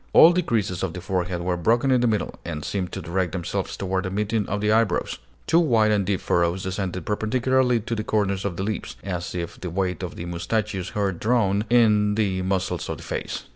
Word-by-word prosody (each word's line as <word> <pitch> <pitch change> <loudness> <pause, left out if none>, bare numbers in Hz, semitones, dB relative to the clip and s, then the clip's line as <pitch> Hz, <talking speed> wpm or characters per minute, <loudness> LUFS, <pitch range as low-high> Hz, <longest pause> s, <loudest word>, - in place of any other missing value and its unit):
All 165 +2 +9
the 180 - +2
creases 105 - -1
of 95 -4 -2
the 90 - -5
forehead 90 -1 -2
were 90 0 0
broken 115 +9 +2
in 125 -2 +4
the 120 - +3
middle, 110 -3 0
and 75 -3 -5
seemed 95 -3 -2
to - - -5
direct 90 0 -1
themselves 90 -3 -3
toward 95 0 -1
the - - -1
meeting 105 +2 -1
of 100 - -1
the 105 +1 +1
eyebrows; 115 0 +1 0.3
two 165 - +4
wide 115 -10 +3
and 105 -2 +2
deep 100 -2 0
furrows 85 +2 +1
descended 95 -2 -3
perpendicularly 125 +3 +1
to 115 - -4
the 110 -2 -2
corners 100 -3 0
of 95 -4 -3
the 95 - -2
lips, 105 -1 -3
as 90 -2 -4
if 85 -1 -5
the 90 - -4
weight 90 +1 -1
of 90 -2 -5
the 85 - -6
moustachios 95 +2 -2
had 100 -4 0
drawn 105 -3 +2
in 105 -3 +4
the 100 -4 0
muscles 95 0 -1
of - - -3
the - - -11
face. - - -4
100 Hz, 220 wpm, -24 LUFS, 90-110 Hz, 0.3 s, All